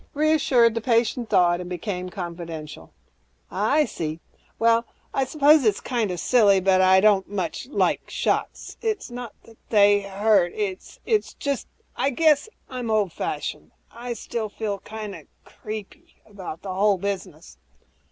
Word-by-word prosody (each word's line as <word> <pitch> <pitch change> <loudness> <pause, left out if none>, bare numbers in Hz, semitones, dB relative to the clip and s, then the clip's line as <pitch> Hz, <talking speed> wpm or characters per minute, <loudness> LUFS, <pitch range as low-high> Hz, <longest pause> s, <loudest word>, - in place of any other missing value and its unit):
Reassured, 280 -6 +3
the 230 - -2
patient 230 0 +1
thawed 175 -1 +3
and 180 - -7
became 180 0 -4
confidential, 170 -4 -7 0.6
"I 280 +10 +2
see. 160 -7 -5 0.4
Well, 230 0 +3 0.3
I 270 - +1
suppose 295 +2 +5
it's 215 -3 +2
kinda 220 -8 -2
silly, 200 0 +4
but 185 0 +3
I 185 0 +6
don't 205 -2 +3
much 195 +3 -4
like 285 - 0
shots. - - -2
It's 435 - -2
not 245 -2 -7
that 225 -1 -18
they 205 -1 +5
hurt... 195 -2 +2
it's 195 -3 -4 0.4
just 280 -3 -3
that - - -39 0.2
I 275 - +3
guess 300 - +3 0.2
I'm 250 -3 -5
old 210 -5 +1
fashioned. - - -4 0.2
I 240 +1 -5
still 225 -1 -4
feel 205 -1 -4
kinda 215 -1 -8 0.2
'creepy' 220 - -9
about 190 -5 -9
the 190 -2 -4
whole 200 +1 +3
business." 185 -4 -6
210 Hz, 140 wpm, -24 LUFS, 185-240 Hz, 0.6 s, I